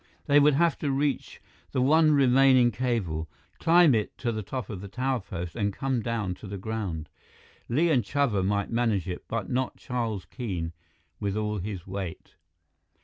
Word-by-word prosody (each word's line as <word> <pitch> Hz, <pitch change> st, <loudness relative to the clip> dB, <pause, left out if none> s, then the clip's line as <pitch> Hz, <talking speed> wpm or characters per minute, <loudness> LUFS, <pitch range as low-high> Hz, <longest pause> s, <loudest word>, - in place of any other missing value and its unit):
They 145 Hz, 0 st, +5 dB
would 145 Hz, -1 st, +5 dB
have 170 Hz, +2 st, +2 dB
to 145 Hz, -, -1 dB
reach 140 Hz, 0 st, -1 dB, 0.3 s
the -, -, +1 dB
one 155 Hz, +3 st, +5 dB
remaining 130 Hz, -2 st, +5 dB
cable, 100 Hz, -, -2 dB, 0.3 s
climb 170 Hz, -3 st, +6 dB
it 110 Hz, -3 st, -1 dB
to 120 Hz, -, -1 dB
the 110 Hz, -1 st, -3 dB
top 125 Hz, +5 st, -5 dB
of 100 Hz, -5 st, -6 dB
the 100 Hz, -, -7 dB
tower 130 Hz, +4 st, -1 dB
post 90 Hz, -4 st, -6 dB
and 100 Hz, -3 st, 0 dB
come 130 Hz, +3 st, -1 dB
down 110 Hz, -5 st, -2 dB
to 105 Hz, -, -10 dB
the 100 Hz, +1 st, -5 dB
ground. 95 Hz, -6 st, -4 dB, 0.6 s
Li 160 Hz, +8 st, +3 dB
and 125 Hz, -6 st, +3 dB
Chuba 115 Hz, -4 st, +1 dB
might 100 Hz, +1 st, 0 dB
manage 115 Hz, -6 st, +1 dB
it; 90 Hz, -, -5 dB
but 115 Hz, 0 st, -3 dB
not 130 Hz, 0 st, -1 dB
Charles 115 Hz, -6 st, -3 dB
Keene, 90 Hz, -10 st, -4 dB, 0.5 s
with 100 Hz, 0 st, -2 dB
all 105 Hz, -1 st, -1 dB
his 95 Hz, -2 st, -5 dB
weight. 95 Hz, -3 st, -6 dB
115 Hz, 175 wpm, -27 LUFS, 100-135 Hz, 0.6 s, climb